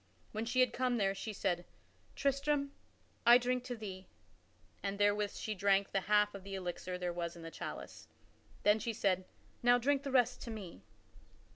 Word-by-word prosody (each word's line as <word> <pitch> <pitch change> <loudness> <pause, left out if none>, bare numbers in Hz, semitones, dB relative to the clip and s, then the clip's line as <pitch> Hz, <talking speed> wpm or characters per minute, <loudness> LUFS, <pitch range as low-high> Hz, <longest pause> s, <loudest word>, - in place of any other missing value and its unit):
When 220 +1 -3
she 255 +2 +2
had 250 -2 +3
come 250 -1 +1
there, 195 -3 +2
she 215 +3 -5
said, 185 -4 -1 0.5
"Tristram, 280 0 +1 0.5
I 240 +1 +9
drink 250 0 0
to 245 - -4
thee," 195 -4 -7 0.7
and 200 0 -2
therewith 205 0 +2
she 215 - -3
drank 200 0 +2
the 195 - +1
half 210 +1 +3
of 200 -2 -8
the 195 0 -6
elixir 180 0 -4
there 180 -1 -2
Was 170 0 -3
in 170 - -10
the 165 - -7
chalice. - - -7 0.6
Then 210 +1 +5
she 230 +1 -2
said, 185 -3 +1 0.4
"Now 245 0 +6
drink 275 +3 +2
thou 280 - -4
the - - -5
rest 250 -1 +3
to - - -6
me." 200 - -7
210 Hz, 185 wpm, -35 LUFS, 195-245 Hz, 0.7 s, I